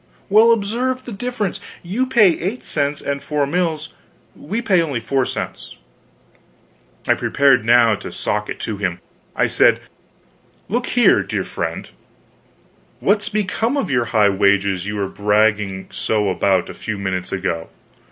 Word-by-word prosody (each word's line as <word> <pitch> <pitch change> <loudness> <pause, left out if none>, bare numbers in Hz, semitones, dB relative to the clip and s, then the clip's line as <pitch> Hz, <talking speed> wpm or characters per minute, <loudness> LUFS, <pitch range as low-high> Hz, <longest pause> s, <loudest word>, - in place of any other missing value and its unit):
"Well, 220 +3 +6
observe 240 +4 -1
the 245 - -7
difference: 230 -2 -3 0.2
you 215 +9 -1
pay 235 -7 +5
eight 200 +9 -3
cents 145 -1 -2
and 140 0 -3
four 150 -2 -1
mills, 160 0 -2 0.4
we 205 +10 -4
pay 190 -7 +2
only 145 -7 -2
four 130 +2 0
cents." - - -6 1.3
I - - +5
prepared 135 -4 +3
now 115 0 +5
to - - -6
sock 105 0 -2
it - - -5
to 110 -2 -4
him. 90 -3 -2 0.4
I - - +2
said: - - +3 0.9
"Look 240 +5 -1
here, 245 -1 +4
dear - - -3
friend, - - -4 1.1
_what's 205 0 +1
become 215 +5 -1
of 210 - -1
your 120 -3 +2
high 110 -3 +3
wages 100 -1 +1
you 105 - -3
were 100 -2 -1
bragging 105 -1 +1
so 105 -2 0
about 95 -1 +1
a - - -8
few 110 -2 -5
minutes 95 -2 -3
ago? 90 -4 -3
140 Hz, 150 wpm, -19 LUFS, -, 1.3 s, Well